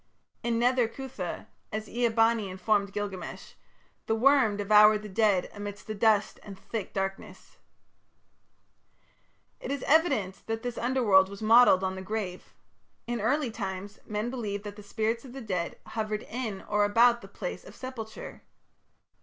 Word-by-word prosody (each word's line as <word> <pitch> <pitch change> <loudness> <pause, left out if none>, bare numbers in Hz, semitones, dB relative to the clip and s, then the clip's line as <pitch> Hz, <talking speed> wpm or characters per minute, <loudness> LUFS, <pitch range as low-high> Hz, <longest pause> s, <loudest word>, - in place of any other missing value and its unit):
In 235 -1 0
Nether 245 0 +3
Cuthah, 230 -8 -6 0.3
as 215 0 -4
Ea 240 0 +1
bani 225 -2 +2
informed 200 +1 0
Gilgamesh, 195 -3 -6 0.5
the 220 - +2
worm 250 -3 +4
devoured 210 +1 +5
the 210 - -7
dead 200 -2 +2
amidst 205 0 -7
the 215 - -4
dust 215 -1 +2
and 200 -2 -10
thick 210 0 -5
darkness. 195 0 -5 2.0
It - - -7
is 280 0 -3
evident 275 - +2
that 225 0 -3
this 245 -1 -4
Underworld 225 -7 +4
was 200 +2 -8
modelled 225 -4 +6
on 190 0 -1
the 190 - -6
grave. 190 -2 -5 0.5
In 240 -2 -3
early 255 +3 +1
times 200 -1 -6
men 210 +3 -2
believed 210 -5 -4
that 205 -1 -7
the 210 - -10
spirits 220 +3 -2
of 255 -3 -11
the 270 - -7
dead 180 -6 -3
hovered 215 -1 -3
in 225 -5 -5
or 210 0 +1
about 235 +3 +4
the 195 - -11
place 195 -2 -6
of - - -13
sepulture. 235 -4 -8
215 Hz, 155 wpm, -28 LUFS, 200-235 Hz, 2.0 s, modelled